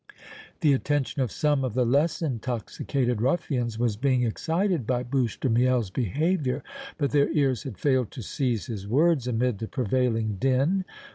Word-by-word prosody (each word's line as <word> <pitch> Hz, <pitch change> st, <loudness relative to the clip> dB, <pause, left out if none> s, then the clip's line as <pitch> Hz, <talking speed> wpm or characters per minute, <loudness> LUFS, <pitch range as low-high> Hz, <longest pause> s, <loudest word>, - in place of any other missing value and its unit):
The 150 Hz, -3 st, +5 dB
attention 140 Hz, 0 st, 0 dB
of 125 Hz, -5 st, -1 dB
some 145 Hz, -3 st, +1 dB
of 125 Hz, -4 st, -3 dB
the 125 Hz, -1 st, +2 dB
less 145 Hz, +7 st, +1 dB
intoxicated 125 Hz, -1 st, -2 dB
ruffians 125 Hz, -5 st, 0 dB
was 115 Hz, -3 st, 0 dB
being 130 Hz, 0 st, +2 dB
excited 165 Hz, -, 0 dB
by 125 Hz, -1 st, 0 dB
Bouche 125 Hz, -2 st, -1 dB
de -, -, 0 dB
Miel's 120 Hz, -3 st, +2 dB
behavior, 140 Hz, -, 0 dB, 0.3 s
but 145 Hz, -3 st, 0 dB
their 145 Hz, -1 st, +3 dB
ears 135 Hz, -6 st, +2 dB
had 125 Hz, -8 st, -7 dB
failed 130 Hz, 0 st, +1 dB
to 125 Hz, -, -7 dB
seize 120 Hz, -2 st, -1 dB
his 100 Hz, -4 st, -6 dB
words 145 Hz, +2 st, +2 dB
amid 125 Hz, -2 st, 0 dB
the 110 Hz, -, -4 dB
prevailing 115 Hz, -4 st, 0 dB
din. 135 Hz, +9 st, +2 dB
130 Hz, 160 wpm, -26 LUFS, 120-145 Hz, 0.3 s, The